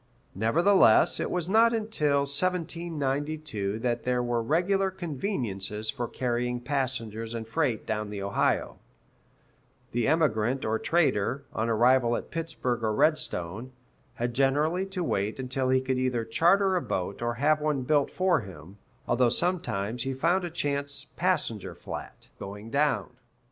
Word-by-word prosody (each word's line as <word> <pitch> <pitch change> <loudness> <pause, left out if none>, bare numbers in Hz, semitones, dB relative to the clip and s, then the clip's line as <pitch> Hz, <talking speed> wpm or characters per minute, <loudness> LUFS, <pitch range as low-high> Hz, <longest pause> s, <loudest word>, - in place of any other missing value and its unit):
Nevertheless, 145 - +4
it - - -1
was 175 -2 -1
not 230 +4 +4
until 150 -11 +1
1792 150 - -1
that 120 -1 -1
there 125 -1 0
were 120 -1 0
regular 180 +9 +1
conveniences 125 - -3
for 120 -4 -4
carrying 125 0 -1
passengers 120 -4 -3
and 115 -1 -5
freight 125 -3 -1
down 105 -1 -2
the 100 -1 -5
Ohio; 100 - 0 1.1
the 120 -1 0
emigrant 135 -5 +1
or 110 0 0
trader, 140 -6 +1
on 115 +1 -1
arrival 120 +1 +4
at - - -8
Pittsburg 155 -8 -3
or 110 - +1
Redstone, 120 - 0 0.4
had 120 0 -2
generally 150 +8 +1
to 190 -2 -3
wait 105 -7 -1
until 130 0 -2
he 130 0 +4
could 130 0 -1
either 125 -3 0
charter 190 - +3
a 180 - +1
boat 95 - -3
or 120 0 -1
have 150 +5 +2
one 150 -3 0
built 145 +1 +2
for 185 -3 +2
him, 95 0 -12 0.3
although 120 0 +3
sometimes 120 - -1
he 135 +2 -2
found 170 +7 +2
a 175 - -3
chance 145 -4 -2
"passenger 170 - -1
flat" - - -8
going 105 +3 -8
down. 140 - +1
130 Hz, 145 wpm, -28 LUFS, 115-160 Hz, 1.1 s, Nevertheless